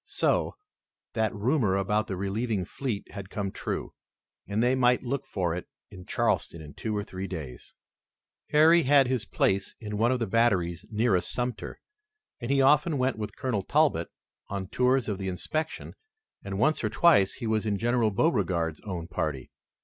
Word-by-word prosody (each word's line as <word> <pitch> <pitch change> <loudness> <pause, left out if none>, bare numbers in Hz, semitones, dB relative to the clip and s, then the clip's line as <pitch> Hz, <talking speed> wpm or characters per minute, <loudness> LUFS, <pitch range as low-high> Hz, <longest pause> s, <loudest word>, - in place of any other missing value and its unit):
So, - - 0 0.6
that 110 -2 +1
rumor 110 -1 +1
about 105 +2 0
the 95 - -3
relieving 100 +1 -1
fleet 110 +1 -4
had 100 -2 -8
come 100 -2 -3
true - - -4 0.5
and 105 +3 0
they 125 +1 +3
might 125 -1 +3
look 135 +1 -3
for 90 -4 -1
it 90 - -6 0.2
in 90 -2 -11
Charleston 85 - 0
in 75 -1 -10
two 110 -2 -3
or 105 - -1
three 95 0 -6
days. 75 -10 -8 0.7
Harry 160 +3 +6
had 140 -1 +5
his 125 -3 -1
place 95 -3 0
in 105 -2 -5
one 115 +2 +3
of 130 - +2
the 120 - -1
batteries 95 -6 +1
nearest 110 -4 +1
Sumter, 125 -4 -4 0.6
and 120 -2 -5
he 135 0 +3
often 150 +3 +4
went 130 -3 0
with 105 -1 -5
Colonel 125 -7 -1
Talbot 140 - +2 0.4
on 95 -1 -4
tours 125 +2 +2
of 100 -2 -3
inspection 95 - -3 0.5
and 100 -1 -4
once 155 +9 +2
or - - +1
twice 145 - +4
he 120 - -6
was 110 0 0
in 100 -1 +1
General 120 0 +2
Beauregard's 90 - 0
own 90 -5 -5
party. 75 -6 -3
105 Hz, 170 wpm, -28 LUFS, 95-125 Hz, 0.7 s, Harry